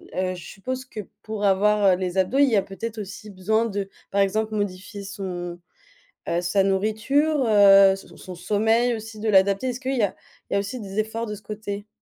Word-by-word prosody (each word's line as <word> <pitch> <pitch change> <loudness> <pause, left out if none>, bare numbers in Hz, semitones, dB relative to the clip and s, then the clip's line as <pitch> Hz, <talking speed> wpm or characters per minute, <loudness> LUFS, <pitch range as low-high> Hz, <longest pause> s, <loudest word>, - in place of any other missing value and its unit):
heu, 185 0 -1
je 175 - -10
suppose 255 +6 -5
que 235 - -9 0.2
pour 215 -1 -5
avoir, 200 0 +4
heu, - - +3
les 185 0 -3
abdos, 190 +8 +1
il 285 -1 +6
y 230 - +2
a - - +4
peut-être 220 +3 -6
aussi 205 +2 -9
besoin 215 +4 +1
de 200 -3 -3 0.2
par 200 - +2
exemple, 215 +3 0
modifier 200 0 -4
son, 180 -3 -6 0.7
heu, 170 - +1
sa 190 +2 +2
nourriture, 230 +10 +1
heu, 200 -2 +7
son 195 - -13
son - - -15
son 185 - -9
sommeil 220 +6 +2
aussi 220 -1 -8
de 220 - -2
l'adapter. 195 +4 +3
Est-ce 250 0 -4
qu'il 265 0 -2
y - - +2
a 200 - -1 0.4
il - - -1
y - - +3
a - - +3
aussi 205 +5 -5
des 200 -1 -7
efforts 220 +2 -1
de 210 - -4
ce 205 - -15
côté? 205 -1 -6
205 Hz, 220 wpm, -24 LUFS, 195-220 Hz, 0.7 s, heu